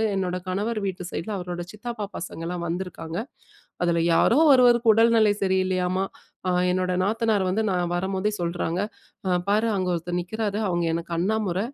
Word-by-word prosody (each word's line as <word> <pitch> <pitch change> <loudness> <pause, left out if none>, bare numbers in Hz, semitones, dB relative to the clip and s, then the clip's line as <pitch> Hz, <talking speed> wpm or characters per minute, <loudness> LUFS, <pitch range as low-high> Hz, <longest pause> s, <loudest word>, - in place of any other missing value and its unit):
என்னோட 180 -2 -1
கணவர் 210 +4 -1
வீட்டு 185 -2 -3
சைட்ல 210 +6 -4
அவரோட 180 -1 -5
சித்தப்பா 215 0 -5
பசங்கள்லாம் 170 0 -5
வந்துருக்காங்க. 170 -1 -4 0.7
அதுல 170 -1 +2
யாரோ 235 - +4 0.2
ஒருவருக்கு 240 -3 +5
உடல்நிலை 225 -2 +5
சரி 190 0 +2
இல்லையாம்மா, 185 0 0 0.4
அ - - +2 0.2
என்னோட 185 0 0
நாத்தனார் 215 -2 +1
வந்து 200 +4 +1
நான் 175 -1 0
வரும்போதே 190 +3 -1
சொல்றாங்க. 170 +1 -1 0.7
பாரு 215 +3 +3
அங்க 185 -1 -1
ஒருத்தர் 175 +1 -2
நிற்கிறாரு. 210 +3 -3
அவுங்க 175 -1 0
எனக்கு 170 +1 -5
அண்ணா 200 +6 +1
முற! 180 +1 -1
185 Hz, 150 wpm, -25 LUFS, 175-215 Hz, 0.7 s, ஒருவருக்கு